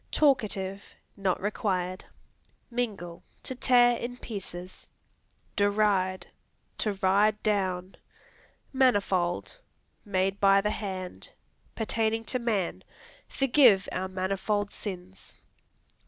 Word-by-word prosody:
Talkative. 205 -9 +1 0.3
Not 195 -2 0
required. 185 -3 -2 0.7
Mingle 205 -8 -3 0.2
To - - -4
tear 245 -1 +4
in 245 +1 -5
pieces. 185 -6 -7 0.7
Deride 200 -2 +2 0.5
To 210 - 0
ride 200 +3 +2
down. 190 -3 -1 0.8
Manifold 205 - +1 0.4
Made 195 -1 0
by 195 0 +6
the 210 +1 0
hand. 190 -4 -6 0.5
Pertaining 225 0 0
to 255 - 0
man; 215 -7 -1 0.4
"Forgive 250 -8 +4
our 185 +1 -2
manifold 195 +2 -1
sins." 185 -2 -8
200 Hz, 90 wpm, -28 LUFS, 185-225 Hz, 0.8 s, by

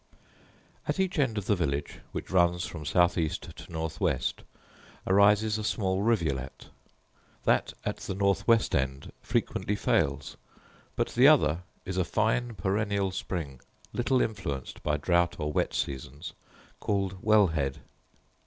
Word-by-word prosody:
At - - -1
each 185 -3 0
end 115 -6 +1
of 100 - -2
the 105 - +3
village, 70 -5 -2
which - - -6
runs 90 -1 +3
from 75 -3 -7
south 85 +3 +3
east 80 -2 -3
to - - -12
north 80 0 -4
west, - - 0 0.6
arises 105 +3 +4
a - - -4
small 95 -3 0
rivulet: 80 - -1 0.7
that - - +2
at - - -2
the 95 - -5
north 100 0 +1
west 115 -2 +4
end 65 +1 -1
frequently 105 - -1
fails; 70 -8 0 0.6
but - - 0
the - - +5
other 75 +3 +5 0.3
is 95 0 -4
a 95 - +3
fine 110 +5 0
perennial 100 -1 0
spring, 80 -8 -5 0.3
little 125 +1 +2
influenced 75 - -4
by 75 0 0
drought 85 +3 +2
or 75 -2 -2
wet - - +1
seasons, 70 +4 -4 0.5
called 95 -2 -1
Well 110 -3 +5
head. 70 -4 -2
95 Hz, 145 wpm, -28 LUFS, 75-105 Hz, 0.7 s, the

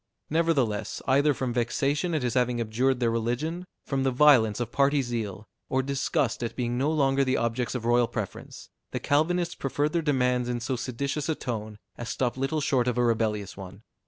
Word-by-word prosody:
Nevertheless, 145 -10 +1
either 140 +3 +4
from 130 -3 -2
vexation 140 +8 0
at 150 - -1
his 120 -2 0
having 125 -1 +1
abjured 120 +3 +1
their 120 -2 +2
religion, 130 +10 -2 0.2
from 135 -1 -1
the 135 - +2
violence 125 -5 +5
of 120 -1 -3
party 140 0 +3
zeal, 110 -4 -4 0.2
or 130 0 +1
disgust 135 -3 -1
at 115 -1 -3
being 120 -1 -1
no 135 +4 +1
longer 140 -3 +2
the 130 0 +1
objects 115 +2 -1
of 120 -2 -3
royal 120 0 +3
preference, - - -6 0.2
the - - -3
Calvinists 170 +4 +1
preferred 145 +2 -1
their 170 - +2
demands 125 -4 +1
in 120 -1 -1
so 130 +3 -2
seditious 140 +5 -3
a 160 - +1
tone, 110 -5 -5 0.2
as 120 0 -5
stopped 125 -2 -1
little 135 +4 -1
short 130 -3 +1
of 125 -1 0
a 125 - +3
rebellious 110 -4 0
one. 95 +2 -10
125 Hz, 190 wpm, -27 LUFS, 115-140 Hz, 0.2 s, violence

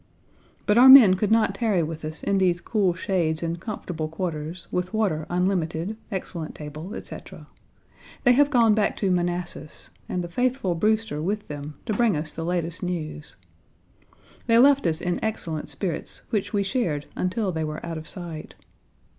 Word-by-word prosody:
But 210 +3 +4
our 260 +2 +9
men 255 -8 +11
could 195 +2 0
not 225 0 +3
tarry 210 -8 +1
with 160 0 -5
us 155 +1 -6
in 200 -1 +1
these 180 -2 +2
cool 190 -1 +1
shades 170 -4 -1
and 170 +1 -2
comfortable 180 -6 -4
quarters, 160 0 -5
with 180 +4 -2
water 180 -8 0
unlimited, 180 +1 -1 0.2
excellent 175 -4 -5
table, 155 +5 -7
etc. - - -9 0.8
They 245 - +6
have 285 +3 +4
gone 235 -6 +4
back 210 -1 +1
to 195 -3 +1
Manassas, 175 -3 -3 0.2
and 180 - -2
the - - -4
faithful 245 0 0
Brewster 215 -2 0
with 205 +5 -3
them 145 0 -6
to 220 - -1
bring 220 -5 +2
us 155 +1 -4
the 165 - -5
latest 170 -1 -2
news. 155 - -5 1.1
They 230 -1 +5
left 275 -3 +5
us 160 -1 0
in 180 -1 -2
excellent 165 -8 -3
spirits, 180 -6 -4
which 210 -3 -1
we 205 -2 +1
shared 190 - -1
until 190 +2 -1
they 160 -2 -2
were 155 +1 -5
out 165 -1 -4
of 160 - -9
sight. 170 -4 -7
180 Hz, 170 wpm, -25 LUFS, 160-210 Hz, 1.1 s, men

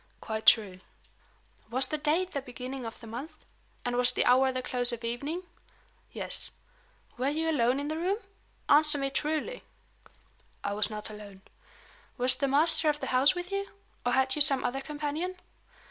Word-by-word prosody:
"Quite 220 0 -5
true." 200 -5 +5 0.9
"Was 255 +3 +3
the 305 - -1
date 330 +5 +1
the 280 - -3
beginning 255 0 -7
of 225 - -9
the 235 - -12
month? 275 +8 -8 0.4
and 245 0 -1
was 245 0 +4
the - - 0
hour 260 +1 +5
the 255 0 -4
close 250 -1 +1
of 235 0 -6
evening?" 280 +10 -3 0.7
"Yes." - - -2 0.7
"Were 260 +2 +1
you 320 +2 -1
alone 255 -2 +2
in 285 - -3
the 310 +1 -3
room? 375 +4 0 0.5
Answer 300 0 +6
me 275 -1 -2
truly!" 310 - -2 1.0
"I 200 - -2
was 210 +1 +1
not 215 0 -6
alone." 200 -2 -11 0.7
"Was 250 0 +5
the 275 +2 0
master 310 +3 +3
of 295 0 -1
the - - -4
house 265 +7 +4
with 355 +1 -6
you? 395 0 -2 0.3
or 245 - 0
had 265 0 +3
you 300 - -1
some 275 -2 +5
other 270 +2 -2
companion?" 300 +5 -4
270 Hz, 175 wpm, -29 LUFS, 245-305 Hz, 1.0 s, Answer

